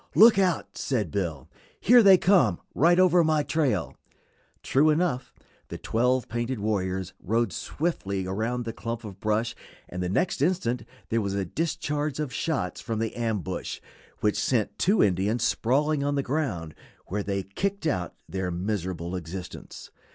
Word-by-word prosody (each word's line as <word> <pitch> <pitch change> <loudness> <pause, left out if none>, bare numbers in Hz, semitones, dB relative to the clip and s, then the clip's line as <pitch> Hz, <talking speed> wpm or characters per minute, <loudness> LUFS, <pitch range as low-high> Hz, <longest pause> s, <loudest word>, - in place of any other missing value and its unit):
"Look 220 -1 +8
out!" 180 -4 0
said 110 - -1
Bill; 80 -8 -3 0.3
"here 245 +1 +7
they 195 -3 +8
come, 175 - +3
right 170 +5 +4
over 180 -2 +5
my 155 -1 +2
trail." 135 - 0 0.7
True 145 +4 +3
enough, 150 -5 0 0.4
the - - -6
twelve 125 +2 +1
painted 120 +2 -2
warriors 95 -3 -2
rode 115 0 0
swiftly 100 - -2
around 115 +6 -2
the 115 - -4
clump 115 0 -5
of 100 -3 -9
brush, 110 +3 0 0.3
and 90 - -5
the 90 - -1
next 135 - 0
instant 145 -7 0 0.2
there 115 0 +1
was 100 -1 -2
a 100 -1 -1
discharge 150 - -2
of 145 -4 -3
shots 160 -4 -2
from 115 -2 -3
the 115 0 -2
ambush 110 -7 -3 0.4
which 105 -1 +1
sent 110 -5 0
two 200 +3 +4
Indians 100 +4 +1
sprawling 145 +5 +1
on 145 0 0
the 140 - 0
ground, 115 - -2 0.3
where 105 +3 -2
they 100 -1 -2
kicked 195 - -3
out 90 - -1
their 95 +2 -3
miserable 90 -1 -3
existence. 90 +1 -8
115 Hz, 155 wpm, -26 LUFS, 95-150 Hz, 0.7 s, Look